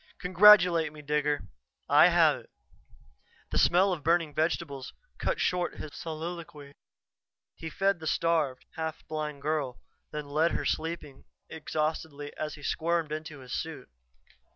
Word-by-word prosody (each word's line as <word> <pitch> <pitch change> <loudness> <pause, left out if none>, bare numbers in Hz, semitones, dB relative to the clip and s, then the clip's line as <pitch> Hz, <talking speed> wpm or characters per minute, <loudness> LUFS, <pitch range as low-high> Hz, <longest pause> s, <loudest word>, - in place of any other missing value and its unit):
"Congratulate 180 -4 +6
me, 150 0 -12
Digger! 150 -3 0 0.4
I - - +7
have - - +4
it!" - - -19 1.0
The - - +1
smell 185 +2 +4
of 155 -5 -6
burning 165 -1 +2
vegetables 155 -3 -2 0.3
cut - - -1
short 180 -1 0
his 150 - -8
soliloquy. 160 -3 -7 0.8
He 160 - -7
fed 195 +1 +1
the 160 - -6
starved, 155 -6 0
half 160 -1 -5
blind 150 -2 -4
girl, 150 -5 -1 0.3
then 150 -1 -5
left 155 +4 +1
her - - -2
sleeping 160 -4 -3 0.2
exhaustedly 155 -2 -3
as 155 0 -4
he 145 - -14
squirmed 165 0 0
into 155 -2 -6
his 125 -2 -9
suit. - - -5
155 Hz, 135 wpm, -29 LUFS, 150-170 Hz, 1.0 s, I